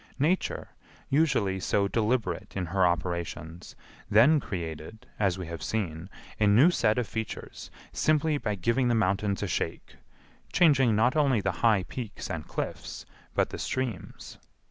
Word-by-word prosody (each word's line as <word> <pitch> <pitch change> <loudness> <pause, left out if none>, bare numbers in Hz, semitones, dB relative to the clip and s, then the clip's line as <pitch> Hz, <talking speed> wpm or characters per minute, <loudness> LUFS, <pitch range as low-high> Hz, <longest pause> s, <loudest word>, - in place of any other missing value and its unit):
Nature, 160 +7 0 0.4
usually 130 -11 +2
so 100 +1 +1
deliberate 110 -5 -1
in 90 - -1
her 95 +1 +2
operations, 85 -1 -4 0.3
then 125 +9 +6
created, 85 - -6
as 95 -3 +1
we 90 - -5
have 85 0 -7
seen, 90 -5 -3 0.3
a 105 - +4
new 120 - +6
set 110 -10 +2
of 125 - +1
features, 110 +1 -6 0.2
simply 155 -1 +1
by 105 -5 -2
giving 115 +7 +1
the 120 - +2
mountains 100 -1 0
a - - -1
shake—changing 135 - 0
not 125 +6 +3
only 140 -6 +3
the 95 -1 0
high 110 -5 +4
peaks 115 +1 -6
and 85 -3 -5
cliffs, - - -5 0.3
but - - +1
the - - -6
streams. 125 -8 -4
105 Hz, 145 wpm, -28 LUFS, 90-125 Hz, 0.4 s, then